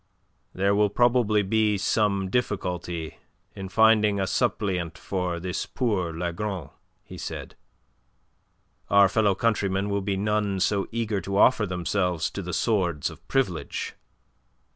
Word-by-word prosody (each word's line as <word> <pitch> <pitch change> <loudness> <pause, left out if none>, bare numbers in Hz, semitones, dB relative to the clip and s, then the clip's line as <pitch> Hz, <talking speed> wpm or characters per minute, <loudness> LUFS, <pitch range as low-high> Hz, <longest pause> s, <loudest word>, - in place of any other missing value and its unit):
"There 100 +2 +2
will 105 0 +3
probably 115 -2 +3
be 105 +1 +2
some 100 -2 +1
difficulty 90 -8 -2 0.4
in 95 -1 -6
finding 105 -1 +4
a 95 - +1
suppleant 95 -7 -1
for 90 -3 -3
this 90 +1 -3
poor 105 -10 -1
Lagron," 85 0 -4 0.3
he - - -11
said. - - -6 1.3
"Our 100 -1 +6
fellow 100 0 +2
countrymen 100 -2 0
will 100 0 0
be 95 0 -1
none 105 -1 0
so 100 +1 +1
eager 110 -3 -1
to 100 +2 -3
offer 105 -1 +4
themselves 90 -1 -1
to 100 - -5
the 90 -1 -5
swords 90 - 0
of - - -15
Privilege." 125 -11 -1
100 Hz, 130 wpm, -26 LUFS, 90-105 Hz, 1.3 s, Our